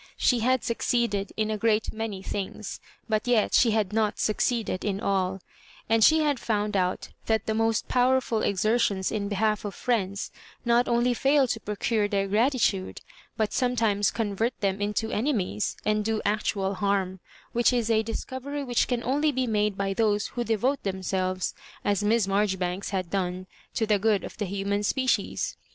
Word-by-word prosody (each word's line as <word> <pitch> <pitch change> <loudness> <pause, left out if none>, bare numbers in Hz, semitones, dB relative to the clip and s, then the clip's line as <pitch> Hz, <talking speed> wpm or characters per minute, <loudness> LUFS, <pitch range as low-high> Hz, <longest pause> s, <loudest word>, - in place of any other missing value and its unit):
She 245 - +3
had 255 +2 +2
succeeded 230 -4 0
in 215 0 0
a 215 - -2
great 220 0 +1
many 215 -3 -4
things, 200 +1 -5 0.3
but 215 +1 0
yet 235 -4 +2
she 240 - +5
had 215 -2 0
not 215 -1 +1
succeeded 220 -2 0
in 200 -2 -1
all; 190 -1 0 0.5
and 225 0 +3
she 315 +5 +6
had 290 -4 +1
found 210 -2 -1
out 185 -1 0 0.2
that 220 -1 +1
the 220 - 0
most 225 0 +1
powerful 250 -2 +2
exer 215 +4 +1
tions 190 -3 0
in 205 -2 -2
behalf 210 +1 0
of 205 -2 -5
friends 200 -5 -1 0.3
not 240 +1 +3
only 240 +1 +2
fail 275 +2 +3
to 225 - -2
procure 210 0 0
their 200 -1 0
gratitude, 215 -3 +1 0.4
but 215 -2 0
sometimes 225 -5 +2
convert 225 +2 -2
them 195 0 -1
into 210 +2 -1
enemies, 210 - -1
and 215 0 +1
do 220 0 0
actual 200 -1 0
harm; 190 -1 -1 0.3
which 240 +1 +3
is 240 -3 0
a^lisoovery 260 +6 -2
which 245 -2 +1
can 240 -2 -1
only 295 +4 +1
be 260 -2 0
made 210 -3 0
by 195 0 -1
those 210 0 +1
who 240 - -3
devote 240 +5 0
themselves, 185 -1 -2 0.3
as 205 0 +1
Miss 220 0 +3
Maijoribanks 190 -2 0
had 185 -3 -3
done, 185 -1 -2 0.3
to 225 - +1
the 210 -2 +2
good 210 -1 +2
of - - -8
the 210 - 0
human 200 +1 -1
species. 260 +5 0
215 Hz, 170 wpm, -26 LUFS, 200-235 Hz, 0.5 s, she